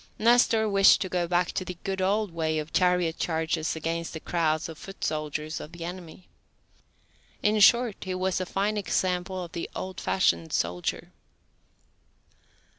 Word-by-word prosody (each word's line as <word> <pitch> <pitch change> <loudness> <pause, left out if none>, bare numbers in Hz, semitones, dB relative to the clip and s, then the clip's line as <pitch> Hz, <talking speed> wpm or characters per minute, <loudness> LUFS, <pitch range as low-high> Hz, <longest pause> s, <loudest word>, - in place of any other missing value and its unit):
Nestor 230 -1 +4
wished 195 -1 +6
to 185 - -2
go 175 -1 -1
back 175 0 +1
to - - -2
the 180 -1 -7
good 195 -1 -2
old 205 +1 +1
way 160 -1 -1
of 155 0 -5
chariot 180 -3 +2
charges 160 -1 -1
against 165 +1 -3
the 160 - -5
crowds 160 -2 0
of 165 -1 -10
foot 195 - -10
soldiers 155 0 -3
of 155 - -10
the 170 -1 -7
enemy. 175 0 -9 1.2
In 215 0 +3
short, 235 +1 +5
he 185 -1 -3
was 185 0 -1
a 185 - -3
fine 205 +3 -1
example 185 -2 -1
of 170 - -9
the 170 - -5
old 185 -1 -5
fashioned 85 - +1
soldier. 90 +1 -2
180 Hz, 160 wpm, -27 LUFS, 160-195 Hz, 1.2 s, wished